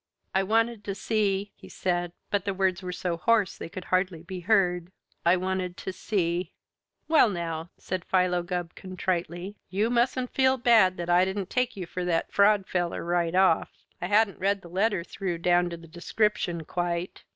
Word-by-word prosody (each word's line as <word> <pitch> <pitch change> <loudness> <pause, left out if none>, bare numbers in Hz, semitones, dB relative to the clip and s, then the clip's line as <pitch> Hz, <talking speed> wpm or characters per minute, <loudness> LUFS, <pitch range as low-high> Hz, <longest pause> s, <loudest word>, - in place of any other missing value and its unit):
"I 190 - +3
wanted 225 +2 +1
to 195 - -3
see," 205 -2 0
he - - -14
said, 175 -1 -1 0.2
but 205 -2 +1
the 195 -1 -2
words 190 -1 +1
were 180 -1 -4
so 180 -1 -2
hoarse 210 +2 +2
they - - -7
could 180 +1 -8
hardly 185 -3 +1
be 185 +1 -6
heard, 180 -3 +2 0.3
"I 175 +2 +4
wanted 185 -1 -2
to 190 - -5
see 180 -3 -1 0.3
" - - -53
"Well, 310 -7 +5
now," 165 -3 -4
said 185 -1 -4
Philo 180 -1 +2
Gubb 175 -1 -4
contritely, 185 +1 -3
"you 210 +5 0
mustn't 250 +1 +1
feel 260 0 +3
bad 225 -7 +5
that 170 0 -4
I 175 +1 +6
didn't 190 0 -3
take 250 -3 0
you 185 - -4
for 180 +2 -5
that 170 -2 -1
fraud 200 -1 +4
feller 175 -2 -2
right 175 0 0
away 190 - +6
off. 165 -4 +2 0.3
I 180 - -1
hadn't 210 0 +3
read 195 +1 0
the 170 - -11
letter 190 0 +1
through 185 -1 -4
down 175 +1 +2
to 170 - -6
the 165 0 -14
description 175 0 -1
quite. 175 +1 -3
185 Hz, 190 wpm, -27 LUFS, 175-205 Hz, 0.3 s, I